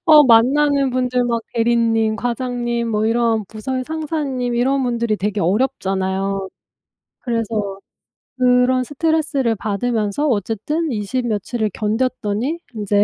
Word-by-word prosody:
어 305 -2 +9
만나는 275 +4 +4
분들 250 0 0
막 235 -1 -1
대리님, 225 -2 +2
과장님, 240 0 -2
뭐 215 -1 0
이런 230 -1 +1
부서의 255 +6 -4
상사님 290 -5 -2
이런 265 +3 +1
분들이 235 -3 0
되게 205 +1 -2
어렵잖아요. 195 -2 0 0.7
그래서 220 -5 -2 0.6
그런 250 0 +3
스트레스를 290 -4 0
받으면서 215 +5 -1
어쨌든 250 - -1
이십 240 +3 -2
며칠을 215 +1 -1
견뎠더니 220 - -1
인제 205 -1 +2
235 Hz, 285 characters per minute, -19 LUFS, 215-255 Hz, 0.7 s, 어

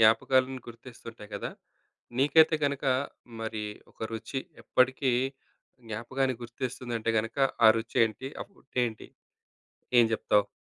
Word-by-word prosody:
జ్ఞాపకాలను 130 +4 +4
గుర్తిస్తుంటాయి 115 -2 -11
గదా! 100 - -3 0.7
నీకైతే 155 +3 +6
గనక 140 0 -1 0.6
మరి 110 -1 -3 0.3
ఒక - - -34
రుచి 115 +4 -4 0.2
ఎప్పటికి 130 +1 +2 0.7
జ్ఞాపకాన్ని 130 +4 -1
గుర్తిస్తుందంటే 120 -1 -3
గనక 115 +4 -3 0.3
ఆ - - +11
రుచి 115 0 -7
ఏంటి? 110 +4 -7
ఆ - - 0
ఫుడ్ 195 - -26
ఏంటి? 115 -2 -5 0.9
ఏం 120 - +7
జెప్తావు? 105 -2 +2
120 Hz, 115 wpm, -29 LUFS, 110-130 Hz, 0.9 s, ఆ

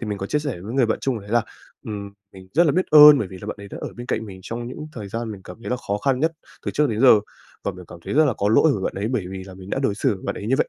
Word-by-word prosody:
Thì 115 - -4
mình 105 -2 -3
có 95 - -4
chia 150 - 0
sẻ 140 - -4
với 105 +5 -7
người 130 -4 +3
bạn 110 - 0
chung 125 -5 -1
đấy 100 +1 -12
là, 120 -1 +3 0.4
ừm, 100 -2 -6 0.2
mình 95 -1 -13
rất 170 - +5
là 145 - +3
biết 185 +2 +1
ơn 150 -1 +10
bởi 100 - -2
vì 95 - -10
là - - -8
bạn 105 - -4
ấy 100 - -9
đã - - -8
ở - - -4
bên 120 +1 -7
cạnh 110 - -2
mình 95 -2 -10
trong 120 +3 -5
những 150 +5 -7
thời 105 -6 -7
gian 115 +2 -4
mình 100 - -9
cảm 90 - -10
thấy - - -5
là 125 - +1
khó 100 -4 -3
khăn 130 +3 0
nhất 160 +2 +2 0.3
từ - - +1
trước 150 0 +1
đến 110 - -2
giờ, 125 -5 +7 0.4
và 100 - -1
mình 90 -1 -11
cảm 85 - -10
thấy - - -3
rất 155 +2 +6
là 140 - +2
có 100 - +1
lỗi 140 +7 +5
với 95 - -4
bạn - - -2
ấy - - 0
bởi 120 -7 -1
vì 95 -1 -6
là 95 -1 -11
mình 95 +1 -11
đã - - -1
đối 120 -7 +1
xử 105 - +1
với 95 - -12
bạn - - -2
ấy 105 - -6
như 130 - +2
vậy. - - +2
110 Hz, 365 wpm, -23 LUFS, 100-135 Hz, 0.4 s, ơn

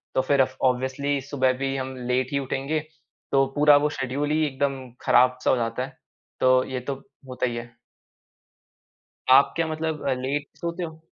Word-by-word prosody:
तो - - +4
फिर 135 +1 +3
of 130 0 0
obviously 130 +2 +1
सुबह 130 -1 +1
भी 135 0 -2
हम 130 0 -4
लेट 125 0 0
ही 140 - +1
उठेंगे, 135 +3 -2 0.5
तो 135 0 +4
पूरा 145 0 +7
वो 150 +1 +2
शेड्यूल 135 +3 -1
ही 155 0 +2
एकदम 135 0 -1 0.3
ख़राब-सा 125 0 +4
हो - - +4
जाता 115 +2 -2
है, 135 -1 -15 0.4
तो 130 0 +4
ये 130 -1 -4
तो 135 +2 -4 0.3
होता 125 0 -2
ही 120 - -3
है। 120 0 -8 1.6
आप 135 +2 +6
क्या 165 -1 0
मतलब 160 -1 -3 0.2
लेट 140 +3 -2
सोते 170 +1 -4
हो? 160 -1 -8
135 Hz, 170 wpm, -25 LUFS, 130-145 Hz, 1.6 s, पूरा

